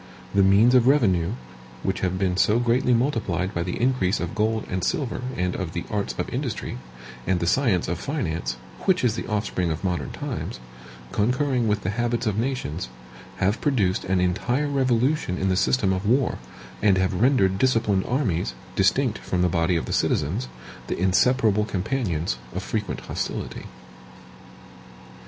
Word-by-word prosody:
The 100 - +4
means 100 +6 +5
of 125 -1 +5
revenue, 100 - +3 0.5
which 95 - -1
have 95 0 -1
been 95 -1 0
so 105 +4 +3
greatly 120 +1 +2
multiplied 115 - 0
by 85 - -1
the 90 +1 -3
increase 120 -6 +1
of - - -3
gold 110 0 0
and 90 -1 -3
silver 125 +5 -1 0.2
and 90 0 0
of 90 -3 -4
the 85 - -3
arts 105 -2 -2
of - - -2
industry, - - -4 0.5
and 95 -2 +2
the 85 - -1
science 95 -2 +2
of 85 0 -2
finance, 90 - -2 0.3
which 185 -5 +3
is 120 -4 +3
the - - -5
offspring 100 -5 -1
of 80 +3 -3
modern 90 -2 -1
times, - - -5 0.5
concurring 125 +2 +1
with 105 -1 0
the 95 - -1
habits 120 +2 -1
of 105 -1 0
nations, 110 - -2 0.5
have 100 +5 0
produced 110 -10 +1
an 95 0 +1
entire 105 +11 0
revolution 130 -5 +1
in 95 +1 0
the 95 - +2
system 100 0 +2
of 95 +1 -2
war, 125 +5 +1 0.4
and 100 -2 +4
have 95 0 +1
rendered 100 -7 +3
disciplined 110 -6 +2
armies, 95 - 0 0.2
distinct 110 +4 +2
from 90 -1 -1
the 90 - +3
body 85 +1 +1
of 80 - -1
the - - -4
citizens, 65 - 0 0.4
the - - -2
inseparable 105 +4 +3
companions 95 - -2 0.2
of - - -3
frequent - - -3
hostility. - - -4
100 Hz, 165 wpm, -24 LUFS, 90-125 Hz, 0.5 s, means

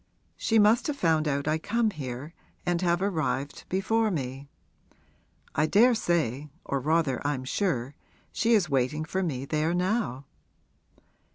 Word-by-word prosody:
She 225 - +1
must 220 +9 +4
have 295 - -1
found 160 - +2
out 140 0 -1
I 155 +1 +1
come 225 +5 0
here 140 -1 -6 0.3
and 175 -1 0
have 175 0 +1
arrived 155 -7 -2
before 220 +4 +1
me. 135 -5 -4 1.1
I 155 - +2
daresay 170 - +2 0.2
or 140 - -1
rather 155 -1 +1
I'm 145 -3 -1
sure 130 - -1 0.4
she 230 +3 +2
is 195 -5 +2
waiting 140 +2 0
for 190 +4 -2
me 135 -7 -2
there 155 +4 0
now.' 180 - -1
160 Hz, 140 wpm, -27 LUFS, 140-195 Hz, 1.1 s, must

